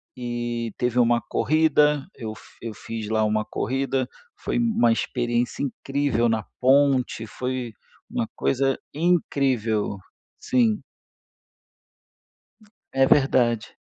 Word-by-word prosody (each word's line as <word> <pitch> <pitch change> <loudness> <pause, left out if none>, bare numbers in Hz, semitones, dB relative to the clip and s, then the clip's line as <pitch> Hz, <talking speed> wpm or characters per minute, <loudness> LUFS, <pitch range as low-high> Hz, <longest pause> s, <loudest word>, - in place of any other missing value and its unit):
e 120 -2 -3
teve 125 0 +1
uma 120 0 +4
corrida. 150 -1 +2
Eu 110 -4 -6
fi 115 -1 -10
fiz 110 0 -6
lá, 110 0 +2
uma 105 0 +1
corrida. 135 0 -1 0.3
Foi - - -2
uma 225 - +3
experiência 120 +1 -1
incrível 135 -2 0
na 110 -2 0 0.2
ponte. 130 -3 +3
Foi 125 -1 -4 0.4
uma 115 - -2
coisa 135 0 +1 0.2
incrível. 135 - +1 0.4
Sim. 230 -4 +2 2.1
É 135 0 +4
verdade. 120 -5 +2
125 Hz, 100 wpm, -24 LUFS, 115-140 Hz, 2.1 s, uma